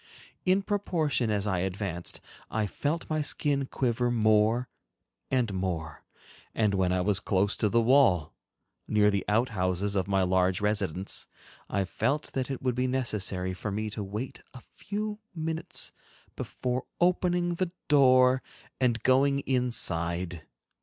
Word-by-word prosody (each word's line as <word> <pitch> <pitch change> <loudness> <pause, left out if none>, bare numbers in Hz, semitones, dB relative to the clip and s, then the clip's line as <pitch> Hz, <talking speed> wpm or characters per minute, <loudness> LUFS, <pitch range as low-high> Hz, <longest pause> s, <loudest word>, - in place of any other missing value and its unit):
In 190 +1 +3
proportion 165 - 0
as 105 -1 0
I 95 -3 0
advanced, 95 -1 -3 0.3
I 110 -1 0
felt 150 - -2
my 155 -1 0
skin 145 -1 0
quiver 120 -2 0
more 110 +1 +3 0.6
and 125 -6 +1
more, 85 -5 -3 0.5
and 105 -3 +2
when 95 -2 +2
I 90 0 +1
was 100 +1 +2
close 100 0 +1
to 105 - +1
the 115 - +3
wall, 115 - +4 0.5
near 105 -1 +4
the 100 -2 0
outhouses 105 -3 +1
of 95 -1 0
my 95 -1 +2
large 95 0 +2
residence, 100 -3 -1 0.4
I 100 0 +1
felt 140 +10 -1
that 130 -1 -2
it 135 -2 -4
would 125 -1 +1
be 125 +1 0
necessary 100 -8 -1
for 90 +4 -5
me 105 +1 -3
to 105 0 -4
wait 105 +6 -5
a 125 - -9
few 210 +1 -4 0.2
minutes 160 0 -4 0.4
before 125 0 -3
opening 175 0 +2
the 175 0 -2 0.2
door 130 -2 +5 0.4
and 120 -3 +1
going 140 +2 +4
inside. 90 - -1
110 Hz, 140 wpm, -28 LUFS, 95-135 Hz, 0.6 s, door